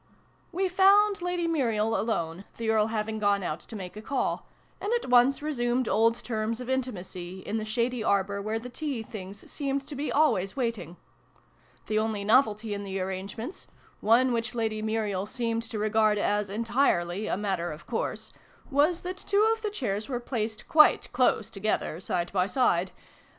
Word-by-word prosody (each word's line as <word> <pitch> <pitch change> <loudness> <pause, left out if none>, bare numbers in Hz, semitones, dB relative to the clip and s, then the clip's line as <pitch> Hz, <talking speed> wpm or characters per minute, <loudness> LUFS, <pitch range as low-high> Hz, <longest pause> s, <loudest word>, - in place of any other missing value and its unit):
" - - -36
We 385 - +3
found 395 +2 +5
Lady 355 -1 -1
Muriel 225 -8 +1
alone, 180 -5 -2
the 225 -1 0
Earl 215 -1 +3
having 220 0 -2
gone 200 -1 +2
out 155 -2 -2
to 225 - -11
make 185 -2 -7
a 215 - -7
call, 270 +5 -2 0.3
and 410 - -2
at 470 - -1
once 250 +4 +5
resumed 245 -4 0
old 225 +3 +3
terms 220 0 -2
of 250 +1 -4
intimacy, 190 -8 -4
in 215 - -3
the 215 - -3
shady 235 +1 -1
arbour 200 -1 +1
where 215 +2 -2
the 230 +2 -7
tea 275 -4 -3
things 200 -2 -9
seemed 275 -1 -2
to 295 - -7
be 290 +2 -2
always 195 -11 +2
waiting. 230 - -3 0.9
The 215 0 +1
only 215 -2 -1
novelty 215 -1 +3
in 200 - -4
the 195 -1 -4
arrangements 195 - -5 0.3
(one 240 +4 +4
which 230 +1 -2
Lady 220 -2 -1
Muriel 215 -3 -1
seemed 230 -1 -1
to 225 - -4
regard 215 0 +2
as 205 0 0
entirely 210 -4 +1
a - - 0
matter 190 -4 -1
of 150 +2 -10
course), 235 - -3 0.4
was 300 +5 +3
that 365 +1 -5
two 405 +2 +2
of 450 - -6
the 430 - -1
chairs 220 - -3
were 245 -3 -1
placed 225 -3 -4
quite 305 -1 +5
close 245 -4 +2
together, 195 -5 -1
side 175 -1 -2
by 185 -1 +2
side. 190 -7 +2
220 Hz, 175 wpm, -28 LUFS, 200-260 Hz, 0.9 s, found